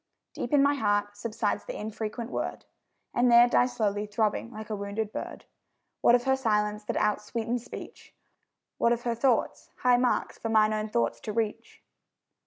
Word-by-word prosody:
Deep - - -5
in 285 -2 +5
my 285 +1 +4
heart 205 -5 0
subsides 215 0 -2
the - - -6
infrequent 220 +3 -5
word, - - -4 0.5
And 245 0 +3
there 235 +1 +8
dies 245 +1 +2
slowly 205 -1 0
throbbing 210 +2 -1
like 215 -1 -8
a - - 0
wounded 205 +1 -3
bird. - - -6 0.6
What 240 - +6
of 245 - +1
her 265 +1 +3
silence, 210 -4 0
that - - -3
outsweetens 230 +2 -1
speech? - - -10 0.6
What 235 - +4
of 240 0 -4
her 235 - 0
thoughts, 235 +1 0
high 250 -1 +4
marks 250 0 0
for 225 - -3
mine 215 -1 +4
own 215 0 -2
thoughts 115 - 0
to 215 - -5
reach? 220 -1 -3
220 Hz, 175 wpm, -28 LUFS, 210-240 Hz, 0.6 s, there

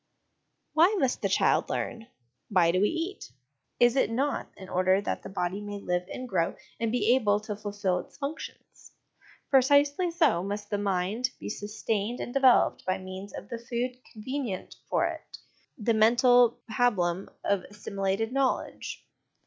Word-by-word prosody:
Why 340 +7 +5
must 265 -7 0
the - - 0
child - - +2
learn? 225 -1 -3 0.4
Why 180 -4 +4
do 185 +2 +1
we 205 - +4
eat? 335 +4 -4 0.5
Is 240 +1 +5
it 265 - +3
not 270 +5 -1
in 190 - -10
order 185 +1 +2
that 200 - -3
the - - -8
body 190 +1 -2
may 205 0 -5
live 180 -2 -2
and 255 - -5
grow 170 -7 0 0.2
and 230 -1 0
be 240 -1 +3
able 210 -5 +3
to 210 -1 -5
fulfil 205 -3 -1
its - - -11
functions? 290 +2 -8 0.6
Precisely 285 +5 +4
so 320 - +2
must 205 +2 -5
the 205 - 0
mind 200 +5 0
be - - -6
sustained 210 +2 -3
and 245 - -5
developed 265 -3 +4
by 185 0 0
means 185 +1 -8
of - - -8
the 235 - -5
food 240 +1 -2 0.2
convenient 235 -2 -4 0.2
for - - +2
it, - - -6 0.4
the 230 -1 +1
mental 240 +2 +5
pabulum 200 -6 +1
of 200 -2 +1
assimilated 200 +2 -2
knowledge. 270 -1 -1
215 Hz, 155 wpm, -28 LUFS, 195-250 Hz, 0.6 s, Why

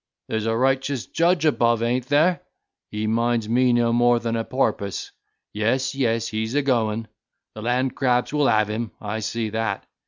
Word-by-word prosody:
There's 110 0 -2
a 115 0 +1
righteous 135 0 0
judge 170 0 +1
above, 120 -6 +2
an't 120 +2 0
there? 160 +6 +3 0.5
He 105 0 -3
minds 115 0 0
me 125 +2 +3
no 120 -1 +2
more 120 0 +4
than 115 0 -2
a 115 - -1
porpoise. 110 -6 -2 0.4
Yes, 125 +5 0
yes, 115 -4 0
he's 110 +3 -3
a 145 - +2
going; 115 -4 0 0.5
the 110 - -8
land 125 +3 0
crabs 125 0 +1
will 150 -2 +2
have 110 -1 +3
him, 110 +1 -4
I 105 +1 -4
see 110 0 -3
that! 110 -2 -2
115 Hz, 175 wpm, -23 LUFS, 110-130 Hz, 0.5 s, more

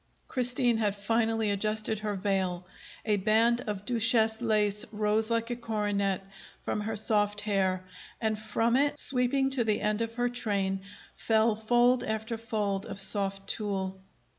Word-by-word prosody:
Christine 245 -2 +1
had 210 -3 0
finally 225 +1 0
adjusted 215 +1 -1
her 210 -1 -2
veil. 185 -2 -1 0.4
A 210 -2 +2
band 225 +4 +3
of 205 -1 -4
duchesse 225 -1 +2
lace 210 -3 +1
rose 215 +1 +1
like 230 +1 0
a - - -1
coronet 205 -4 -1 0.4
from 210 - -2
her 220 +2 -3
soft 205 -1 +1
hair, 190 -3 0 0.4
and 220 -1 -1
from 225 +2 0
it, 290 +2 +2
sweeping 270 +1 +1
to 260 -3 +1
the 215 -2 +1
end 210 +1 0
of 230 0 -3
her 245 0 +1
train, 200 -5 -1 0.3
fell 220 0 +2
fold 240 +3 +3
after 220 +1 -3
fold 210 -4 -2
of - - -6
soft 195 0 +1
tulle. 190 -3 -2
215 Hz, 150 wpm, -29 LUFS, 205-230 Hz, 0.4 s, band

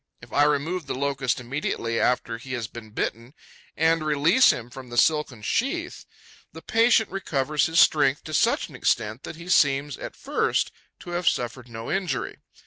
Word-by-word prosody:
If - - -15
I 145 - +4
remove 150 +3 -1
the - - -3
Locust 135 -2 -1
immediately 120 -3 -2
after 120 -2 0
he 130 +2 -8
has 120 -3 -2
been 115 -2 -11
bitten 115 +5 -4 0.4
and 160 0 +2
release 155 - +4
him 120 0 -6
from 130 -1 -10
the 120 - -6
silken 150 -7 +2
sheath, 335 - -2 0.5
the - - -11
patient 225 -1 +3
recovers 150 -6 0
his 160 +1 +2
strength 145 -3 +4
to 155 - -8
such - - +2
an - - -13
extent 110 +4 0
that - - -7
he 170 +2 -11
seems, 140 -5 +2
at - - -7
first, - - 0 0.3
to 175 - -8
have 175 0 +2
suffered 125 0 -4
no 115 0 -6
injury. 180 -9 -2
140 Hz, 175 wpm, -25 LUFS, 125-165 Hz, 0.5 s, I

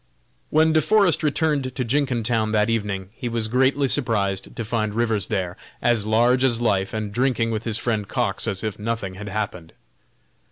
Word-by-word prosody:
When 160 +1 +3
De 155 - +4
Forest 190 +1 +3
returned 145 -4 0
to 125 - -1
Jenkintown 120 -4 0
that 105 +1 +2
evening, 100 -4 -2
he 120 - -5
was 115 -1 -1
greatly 130 +4 +2
surprised 105 -8 -1
to 115 - -4
find 110 -1 -1
Rivers 110 -5 +1
there, 90 -2 -2 0.2
as 115 -3 +1
large 120 +4 +3
as 120 -3 +3
life, 100 -5 +1
and 110 -2 -3
drinking 120 0 +1
with 110 0 -3
his 115 -2 +1
friend 110 -4 -1
Cox - - -1
as 95 +1 -3
if 110 -2 -3
nothing 105 -3 -3
had 105 +2 -7
happened. 95 -5 -4
115 Hz, 175 wpm, -23 LUFS, 105-125 Hz, 0.2 s, De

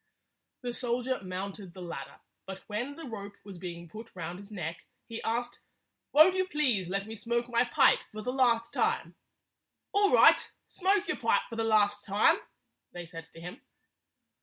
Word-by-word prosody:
The 245 -1 -3
soldier 245 0 -1
mounted 190 0 -6
the 185 - -8
ladder, 170 - -7 0.3
but 190 0 -7
when 240 +7 -3
the 330 - -8
rope 205 -4 -7
was 195 -3 -10
being 170 -1 -7
put 220 +7 -10
round 175 0 -5
his 200 0 -12
neck, 170 -4 -5 0.2
he 230 -1 -6
asked, 240 +1 -2 0.5
"Won't 315 +5 +7
you 375 0 +1
please 255 - +1
let 195 +1 -1
me 220 +1 -7
smoke 235 +2 -1
my 240 0 +2
pipe 240 - +5
for 215 0 -7
the 250 - -2
last 235 -3 +2
time?" - - 0 0.8
"All 405 -1 +3
right - - +6 0.2
Smoke 390 +1 +1
your - - -1
pipe - - +2
for - - -4
the 225 - 0
last 205 -2 +3
time," 205 +1 +4 0.5
they 175 -1 -7
said 165 -1 -10
to 165 - -11
him. 180 +1 -8
220 Hz, 175 wpm, -30 LUFS, 190-245 Hz, 0.8 s, Won't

